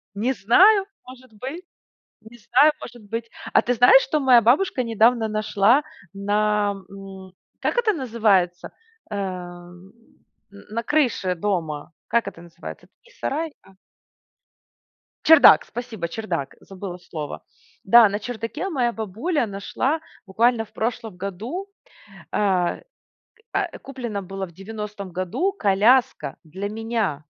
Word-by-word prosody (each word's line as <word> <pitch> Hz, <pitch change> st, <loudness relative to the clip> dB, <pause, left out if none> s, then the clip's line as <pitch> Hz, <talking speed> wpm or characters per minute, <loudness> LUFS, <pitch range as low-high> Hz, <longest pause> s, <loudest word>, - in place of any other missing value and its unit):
Не 240 Hz, +6 st, 0 dB
знаю, 385 Hz, -, +5 dB, 0.2 s
может 255 Hz, -1 st, -14 dB
быть. 270 Hz, -, -7 dB, 0.6 s
Не 225 Hz, +2 st, -15 dB
знаю, 255 Hz, +7 st, +4 dB
может 240 Hz, -1 st, -10 dB
быть. 230 Hz, +1 st, -5 dB, 0.2 s
А -, -, +5 dB
ты 245 Hz, -, 0 dB
знаешь, 250 Hz, +3 st, +7 dB
что 300 Hz, +3 st, -1 dB
моя 255 Hz, -3 st, +6 dB
бабушка 255 Hz, -, +2 dB
недавно 230 Hz, 0 st, +2 dB
нашла 215 Hz, +5 st, +2 dB, 0.3 s
на 205 Hz, +1 st, 0 dB, 0.2 s
м 195 Hz, -1 st, -11 dB, 0.3 s
Как -, -, -1 dB
это 445 Hz, -3 st, +3 dB
называется? 215 Hz, -, 0 dB, 0.4 s
Эм, 180 Hz, -2 st, -7 dB, 0.6 s
н 200 Hz, -, -15 dB
на 230 Hz, +2 st, -2 dB
крыше 235 Hz, -9 st, +1 dB
дома. 165 Hz, -5 st, -3 dB, 0.2 s
Как 235 Hz, 0 st, +1 dB
это 170 Hz, -, -11 dB
называется? 170 Hz, 0 st, -10 dB
Это -, -, -42 dB
не 485 Hz, -, -21 dB
сарай 310 Hz, -, -3 dB
а -, -, -20 dB, 1.5 s
Чердак, 320 Hz, -2 st, +8 dB
спасибо 230 Hz, -7 st, -6 dB
чердак, 170 Hz, -7 st, -4 dB
забыла 190 Hz, -2 st, -8 dB
слово. 155 Hz, -4 st, -7 dB, 0.4 s
Да, 235 Hz, -2 st, +7 dB
на 205 Hz, -, -3 dB
чердаке 230 Hz, -, -5 dB
моя 250 Hz, -8 st, 0 dB
бабуля 230 Hz, -, -2 dB
нашла 225 Hz, +9 st, -2 dB, 0.3 s
буквально 225 Hz, +4 st, +2 dB
в -, -, -26 dB
прошлом 225 Hz, -4 st, -3 dB
году, 220 Hz, -, -5 dB, 0.6 s
а, 185 Hz, -4 st, +1 dB
к -, -, -18 dB, 0.7 s
а, -, -, +1 dB
а, -, -, -8 dB
куплено 240 Hz, -7 st, -5 dB
было 195 Hz, +1 st, -5 dB
в -, -, -16 dB
90 205 Hz, +1 st, -7 dB
году 185 Hz, -, -1 dB
коляска 220 Hz, -, +2 dB
для 190 Hz, +6 st, -6 dB
меня. 215 Hz, -9 st, -2 dB
215 Hz, 130 wpm, -23 LUFS, 195-245 Hz, 1.5 s, Чердак